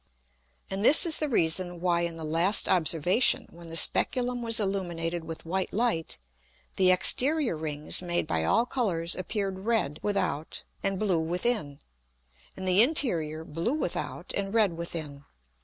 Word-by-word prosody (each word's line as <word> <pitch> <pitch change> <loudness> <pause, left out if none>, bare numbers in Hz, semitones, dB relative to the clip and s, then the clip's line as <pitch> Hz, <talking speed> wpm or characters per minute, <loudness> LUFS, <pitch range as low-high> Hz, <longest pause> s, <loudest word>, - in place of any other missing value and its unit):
And 195 +1 -2
this 295 - +8
is 325 -2 +3
the 305 - -1
reason 175 -4 0
why 175 -1 +1
in 170 -1 -3
the 160 - -7
last 170 +6 +2
Observation, 175 - +2
when 170 0 -13
the 165 0 -3
Speculum 245 +6 +2
was 230 0 0
illuminated 175 -4 -3
with 165 0 -8
white 185 +3 -2
Light, 215 - -1 0.6
the 185 -1 +3
exterior 260 - +2
Rings 150 0 -3
made 175 -1 -1
by 80 -1 -1
all 155 - +2
Colours 185 -10 -2
appeared 195 +1 -4
red 190 -9 -1
without 165 -7 -2 0.2
and 195 -1 -1
blue 185 -5 +1
within, 170 -2 -2 0.8
and 190 - -5
the 185 +3 +6
interior 175 - +2
blue 165 - -2
without 310 - -4
and 200 +2 -2
red 210 -6 +3
within. 155 -4 -6
180 Hz, 150 wpm, -27 LUFS, 165-215 Hz, 0.8 s, this